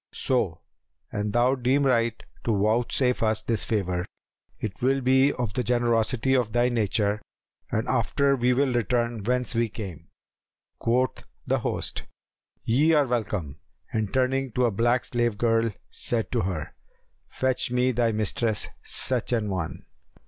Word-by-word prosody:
So, -, -, 0 dB, 0.5 s
an 105 Hz, +1 st, -2 dB
thou 120 Hz, +4 st, +3 dB
deem 135 Hz, +2 st, +2 dB
right 115 Hz, -3 st, +2 dB, 0.3 s
to 115 Hz, -, +2 dB
vouchsafe 120 Hz, +4 st, +1 dB
us 110 Hz, -2 st, +1 dB
this 115 Hz, -3 st, 0 dB
favour, 90 Hz, -4 st, -1 dB, 0.5 s
it 105 Hz, -4 st, -5 dB
will 135 Hz, +2 st, +2 dB
be 130 Hz, +2 st, +4 dB
of 120 Hz, -5 st, -3 dB
the 125 Hz, -, -1 dB
generosity 120 Hz, +2 st, +1 dB
of 120 Hz, -4 st, +1 dB
thy 120 Hz, +1 st, +3 dB
nature, 105 Hz, -2 st, 0 dB, 0.5 s
and 110 Hz, -, -1 dB
after 140 Hz, +3 st, +2 dB
we 125 Hz, -1 st, +2 dB
will 130 Hz, 0 st, +2 dB
return 120 Hz, -1 st, 0 dB
whence 125 Hz, +3 st, 0 dB
we 115 Hz, -1 st, +1 dB
came." 100 Hz, -7 st, -8 dB, 0.7 s
Quoth 125 Hz, +2 st, +1 dB, 0.2 s
the -, -, +1 dB
host, -, -, -3 dB, 0.6 s
"Ye 145 Hz, +8 st, +3 dB
are 150 Hz, -2 st, +4 dB
welcome;" 105 Hz, -, -2 dB, 0.4 s
and, 110 Hz, -3 st, -1 dB
turning 130 Hz, 0 st, +1 dB
to 125 Hz, +1 st, +2 dB
a 120 Hz, -, +2 dB
black 120 Hz, +4 st, +1 dB
slave 120 Hz, -3 st, 0 dB
girl, 115 Hz, 0 st, +2 dB, 0.2 s
said 115 Hz, -2 st, -2 dB
to 120 Hz, -, +1 dB
her, 90 Hz, -6 st, -3 dB, 0.6 s
"Fetch 130 Hz, -2 st, 0 dB
me 125 Hz, +1 st, +2 dB
thy 120 Hz, -1 st, +1 dB
mistress 110 Hz, +1 st, -1 dB
such 125 Hz, -2 st, +1 dB
an 110 Hz, -4 st, 0 dB
one." 90 Hz, -4 st, -4 dB
120 Hz, 150 wpm, -26 LUFS, 110-125 Hz, 0.7 s, be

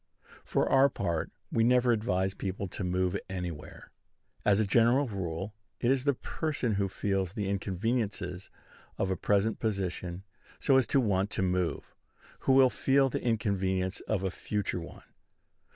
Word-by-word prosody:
For -, -, +1 dB
our 135 Hz, +1 st, +5 dB
part, 85 Hz, -, -2 dB, 0.2 s
we 115 Hz, -, +2 dB
never 125 Hz, +1 st, +4 dB
advise 95 Hz, -4 st, 0 dB
people 100 Hz, 0 st, -4 dB
to 95 Hz, -, -5 dB
move 90 Hz, 0 st, 0 dB
anywhere. 90 Hz, -5 st, -6 dB, 0.5 s
As 100 Hz, 0 st, +4 dB
a 110 Hz, -, +3 dB
general 120 Hz, +7 st, +4 dB
rule, 95 Hz, -1 st, -4 dB, 0.3 s
it 120 Hz, -, +2 dB
is 135 Hz, 0 st, +1 dB
the 140 Hz, -2 st, +3 dB
person 145 Hz, -4 st, -2 dB
who 100 Hz, -1 st, 0 dB
feels 95 Hz, -2 st, -1 dB
the 105 Hz, -2 st, -2 dB
inconveniences 100 Hz, -1 st, -2 dB, 0.5 s
of 95 Hz, -, 0 dB
a -, -, +1 dB
present 105 Hz, +4 st, +1 dB
position, 95 Hz, -4 st, -3 dB, 0.3 s
so 135 Hz, -, +3 dB
as 130 Hz, -4 st, +3 dB
to 135 Hz, -, +3 dB
want 100 Hz, -4 st, +1 dB
to 95 Hz, -, -2 dB
move, 90 Hz, -1 st, -1 dB, 0.5 s
who 135 Hz, -, +2 dB
will 130 Hz, -1 st, +6 dB
feel 135 Hz, 0 st, +3 dB
the -, -, -2 dB
inconvenience 95 Hz, -4 st, 0 dB
of 100 Hz, -3 st, 0 dB
a 95 Hz, -, 0 dB
future 105 Hz, -1 st, -2 dB
one. 85 Hz, -, -10 dB
100 Hz, 155 wpm, -30 LUFS, 95-120 Hz, 0.5 s, will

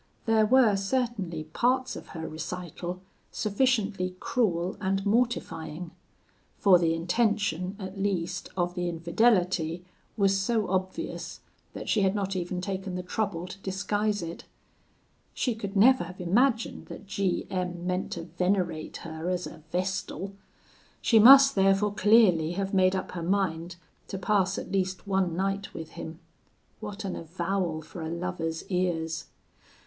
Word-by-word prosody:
There 220 Hz, -2 st, +4 dB
were 245 Hz, -3 st, +5 dB
certainly 195 Hz, -6 st, -1 dB
parts 250 Hz, +11 st, 0 dB
of -, -, -9 dB
her 160 Hz, 0 st, -4 dB
recital 175 Hz, +2 st, -6 dB, 0.3 s
sufficiently 205 Hz, -5 st, 0 dB
cruel 185 Hz, -7 st, 0 dB
and 195 Hz, 0 st, 0 dB
mortifying; 180 Hz, -8 st, -1 dB, 0.7 s
for 185 Hz, -3 st, +6 dB
the 165 Hz, -1 st, +2 dB
intention, 185 Hz, 0 st, 0 dB
at 190 Hz, -1 st, -7 dB
least, 185 Hz, -2 st, -2 dB
of 175 Hz, 0 st, 0 dB
the 175 Hz, -1 st, -2 dB
infidelity 175 Hz, -1 st, +1 dB, 0.3 s
was 195 Hz, -2 st, +3 dB
so 210 Hz, +2 st, +1 dB
obvious, 185 Hz, 0 st, -3 dB, 0.3 s
that -, -, -7 dB
she 215 Hz, -, +2 dB
had 195 Hz, +1 st, +2 dB
not 195 Hz, -1 st, -1 dB
even 180 Hz, 0 st, -2 dB
taken 190 Hz, -1 st, -4 dB
the 180 Hz, -, -3 dB
trouble 180 Hz, -2 st, -2 dB
to 185 Hz, +2 st, -9 dB
disguise 205 Hz, +1 st, -1 dB
it. 165 Hz, 0 st, -7 dB, 0.9 s
She 250 Hz, -, 0 dB
could 210 Hz, -2 st, -6 dB
never 250 Hz, +1 st, +6 dB
have 185 Hz, +2 st, -10 dB
imagined 225 Hz, +7 st, +1 dB
that -, -, -9 dB
G 195 Hz, -2 st, -1 dB
M 180 Hz, -2 st, -3 dB
meant 180 Hz, +1 st, -1 dB
to -, -, -5 dB
venerate 175 Hz, -1 st, -1 dB
her 160 Hz, +1 st, -4 dB
as 180 Hz, -1 st, -1 dB
a 165 Hz, -, -10 dB
vestal. 190 Hz, +1 st, -2 dB, 0.7 s
She 225 Hz, -, +4 dB
must 275 Hz, +4 st, +9 dB
therefore 195 Hz, +1 st, +3 dB
clearly 195 Hz, -7 st, +4 dB
have 195 Hz, +1 st, -3 dB
made 185 Hz, 0 st, +4 dB
up 190 Hz, -, -3 dB
her 175 Hz, -, -5 dB
mind 175 Hz, -2 st, -1 dB, 0.3 s
to 195 Hz, -, -5 dB
pass 190 Hz, -1 st, +1 dB
at -, -, -6 dB
least 190 Hz, 0 st, -1 dB
one 190 Hz, -4 st, +1 dB
night 195 Hz, +1 st, -2 dB
with 160 Hz, -1 st, -7 dB
him. 160 Hz, 0 st, -7 dB, 0.6 s
What 210 Hz, -1 st, -6 dB
an 190 Hz, -, -3 dB
avowal 170 Hz, -1 st, -2 dB
for 165 Hz, +3 st, -9 dB
a 160 Hz, -, -4 dB
lover's 170 Hz, -1 st, -3 dB
ears! 170 Hz, -3 st, -1 dB
190 Hz, 145 wpm, -28 LUFS, 175-205 Hz, 0.9 s, must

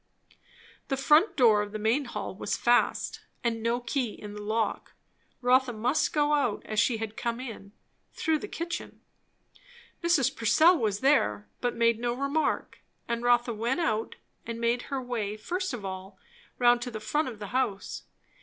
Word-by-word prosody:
The 270 Hz, -, -1 dB
front 305 Hz, +9 st, +4 dB
door 225 Hz, -5 st, +5 dB
of 205 Hz, 0 st, -5 dB
the -, -, -2 dB
main 225 Hz, +7 st, +1 dB
hall 210 Hz, -5 st, -5 dB
was 190 Hz, -, -3 dB
fast, 240 Hz, 0 st, +2 dB, 0.2 s
and 230 Hz, -2 st, -1 dB
no 230 Hz, +2 st, +1 dB
key 245 Hz, -1 st, -2 dB
in 210 Hz, -1 st, -9 dB
the 210 Hz, -, -7 dB
lock; 220 Hz, +2 st, -2 dB, 0.5 s
Rotha 250 Hz, 0 st, +3 dB
must 245 Hz, +7 st, +1 dB
go 295 Hz, -1 st, +2 dB
out 275 Hz, -8 st, +1 dB
as 215 Hz, -1 st, -1 dB
she 225 Hz, +2 st, +3 dB
had 220 Hz, -1 st, -5 dB
come 235 Hz, 0 st, -2 dB
in, 225 Hz, -6 st, -8 dB, 0.4 s
through 320 Hz, -2 st, 0 dB
the 415 Hz, -, -6 dB
kitchen. 345 Hz, -2 st, -5 dB, 1.0 s
Mrs. 340 Hz, -7 st, +3 dB
Purcell 320 Hz, -, +5 dB
was 215 Hz, -, -1 dB
there, 105 Hz, -, +2 dB
but 245 Hz, -, -1 dB
made 230 Hz, -1 st, +3 dB
no 240 Hz, 0 st, 0 dB
remark, 275 Hz, +4 st, -1 dB, 0.3 s
and 235 Hz, 0 st, -2 dB
Rotha 240 Hz, 0 st, +3 dB
went 235 Hz, +7 st, -1 dB
out 225 Hz, -10 st, -1 dB, 0.3 s
and 230 Hz, 0 st, -6 dB
made 235 Hz, +1 st, +1 dB
her 275 Hz, -, -1 dB
way 225 Hz, -5 st, -3 dB
first 360 Hz, -, -3 dB
of 230 Hz, -6 st, -6 dB
all 190 Hz, 0 st, -7 dB, 0.4 s
round 240 Hz, -1 st, +4 dB
to 245 Hz, -, -3 dB
the 220 Hz, -3 st, -6 dB
front 295 Hz, +8 st, 0 dB
of 235 Hz, -4 st, -6 dB
the 205 Hz, -1 st, -7 dB
house. 230 Hz, -7 st, -1 dB
240 Hz, 175 wpm, -28 LUFS, 215-270 Hz, 1.0 s, door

